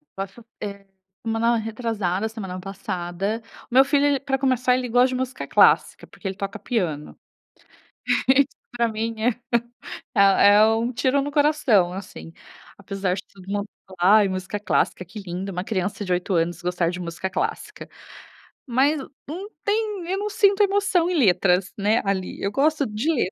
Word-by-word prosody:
Posso, 195 +4 -7 0.2
eh, 200 -1 -6 0.4
semana 230 +1 +1
retrasada 220 -3 -2
semana 190 -5 -6
passada, 195 +1 -4 0.3
o - - -8
meu 265 - +8
filho 285 0 +2
ele 285 -1 +2
pra 270 -1 -1
começar 255 -2 +2
ele 250 -1 -2
gosta 245 +2 +4
de 255 - -3
música 255 0 -4
clássica, - - +3
porque - - -9
ele 190 - -3
toca 195 +2 -5
piano. 175 -9 -3 1.1
Isso 270 +1 +5 0.3
pra 235 -1 +2
mim 225 +1 -3
é, 235 - +3 0.9
eh, 200 0 +6
é 210 +1 +7
um 225 +2 +1
tiro 260 +3 +1
no 285 +1 -4
coração, 285 - +3
assim. 185 -3 -9 0.4
Apesar 195 -2 -2
de 190 - -6
todo 190 -2 -15
mundo 205 0 -2 0.2
falar: 190 +3 +4
"Ai, 205 - +3
música 185 +2 -4
clássica 190 -2 0
que 200 +5 -9
linda, 190 0 -5
uma 180 0 -3
criança 200 0 -2
de 185 - 0
8 180 +2 -1
anos 170 0 0
gostar 175 -1 0
de 180 +1 -5
música 175 +2 -4
clássica". - - -4 0.8
Mas 270 +5 +2 0.3
não 365 +8 -6 0.2
tem 410 -4 -1
eu 380 - 0
não 415 +1 -2
sinto 405 -1 +3
emoção 390 -4 +2
em 365 - -1
letras, 185 - +3
né, 210 +3 +2
ali. 190 -2 -2
Eu 200 - -1
gosto 295 +4 +2
de 220 +9 -1
letras, 240 - 0
215 Hz, 170 wpm, -23 LUFS, 190-265 Hz, 1.1 s, meu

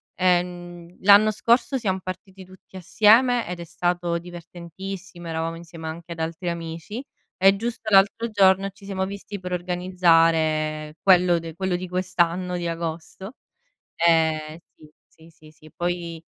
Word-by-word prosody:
ehm, 175 -1 -1
l'anno 205 +2 +7
scorso 235 +5 +1
siamo 190 -6 -1
partiti 190 +1 -8
tutti 185 +1 -18
assieme 225 +7 +3
ed 175 0 -6
è - - -5
stato 175 +1 -1
divertentissimo, 175 +2 -9
eravamo 165 +1 -3
insieme 165 -1 -10
anche 170 +2 -8
ad 165 - -7
altri 165 +2 -3
amici, 170 +7 -6 0.4
e 195 +1 +5
giusto 225 +1 -4
l'altro 210 +3 +3
giorno 195 -1 +3
ci 200 +1 -21
siamo 195 -1 -3
visti 200 +1 -7
per 180 0 -6
organizzare 165 -4 +1
quello 180 -2 +4
de 165 -1 -9
quello 185 0 -1
di 185 +1 -6
quest'anno 180 0 -1
di 175 -1 -3
Agosto, 170 +6 -6 0.6
ehm, 160 -2 +2 0.6
sì, 160 0 -18
sì, 155 -1 -18
sì 155 0 -18
poi 175 -1 -4
175 Hz, 140 wpm, -23 LUFS, 165-190 Hz, 0.6 s, l'anno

